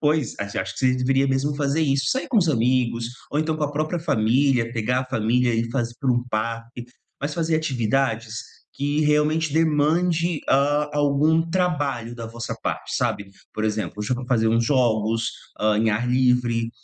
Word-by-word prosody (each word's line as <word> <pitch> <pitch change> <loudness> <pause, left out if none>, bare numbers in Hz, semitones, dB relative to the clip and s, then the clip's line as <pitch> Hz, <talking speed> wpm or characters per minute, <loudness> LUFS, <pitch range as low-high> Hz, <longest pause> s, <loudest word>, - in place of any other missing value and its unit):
pois, 150 -5 +1
a - - -1 0.2
acho - - -4
que - - -11
você 130 -1 +3
deveria 135 +2 +2
mesmo 135 +2 0
fazer 145 +2 0
isso. 135 -2 +1
Sair 260 - -1
com 240 - 0
os 170 -4 +2
amigos, 120 -2 +1 0.2
ou 145 - -1
então 155 0 0
com 155 - -5
a 145 - -2
própria 155 +4 -1
família, 125 -3 +2
pegar 125 +2 0
a - - -10
família 120 0 +1
e 115 +1 -1
fazer 120 -2 -2
para 130 -3 +2
um 120 0 0
parque. 115 +2 -4 0.4
Mas 145 +2 -2
fazer 165 -1 +1
atividades 120 -5 -1 0.4
que 145 +2 -1
realmente 150 +1 +2
demande, 165 +2 +2
hã, 145 +2 +2
algum 145 +3 +3
trabalho 145 -10 -1
da 115 -1 -7
vossa 115 0 -5
parte, - - -3
sabe? 100 - -1 0.3
Por 110 - -3
exemplo, 105 -5 -2
hoje 105 +3 -4
eu 125 - +2
vou 130 - -6
fazer 115 -3 +2
uns 115 +1 +2
jogos, 115 -3 +1 0.3
hã, 105 0 +2
em 110 0 +2
ar 110 +4 0
livre, 125 -2 +2
130 Hz, 185 wpm, -23 LUFS, 115-150 Hz, 0.4 s, você